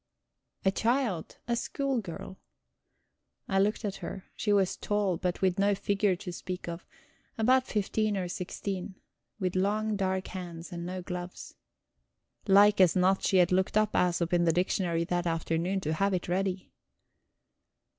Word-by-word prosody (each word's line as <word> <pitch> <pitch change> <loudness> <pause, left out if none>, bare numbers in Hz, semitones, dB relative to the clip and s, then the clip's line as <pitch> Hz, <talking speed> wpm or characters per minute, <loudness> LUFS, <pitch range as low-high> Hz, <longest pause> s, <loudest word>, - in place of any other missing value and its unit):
A 190 - +5
child, 230 -5 0
a 235 - +1
schoolgirl. 235 -8 -3 1.1
I 195 - +1
looked 210 +3 +1
at 195 -2 -3
her 190 - -8
she 210 - -1
was 195 -2 +3
tall, 205 -3 0
but 180 +1 -2
with 185 0 +2
no 200 0 +3
figure 200 -1 +1
to 180 -1 -7
speak 180 0 -6
of, 170 0 -6 0.5
about 255 +3 +3
fifteen 210 0 0
or 185 -2 -2
sixteen, 185 +1 -4 0.4
with 185 -2 -1
long, 210 +3 +1
dark 190 -1 -1
hands 175 -2 -7
and 170 0 -5
no 185 0 -5
gloves. 180 0 -6 0.9
Like 205 +1 +6
as 180 -3 +5
not 190 +1 +3
she 190 - +2
had 180 -1 +4
looked 190 +3 +2
up 215 0 +3
Æsop 175 -1 +1
in 175 0 +3
the 165 - +4
dictionary 175 -1 0
that 175 0 -1
afternoon, 165 +3 0
to 155 -1 -1
have 195 +3 +1
it 180 - -3
ready. 185 +1 -1
190 Hz, 155 wpm, -29 LUFS, 175-205 Hz, 1.1 s, Like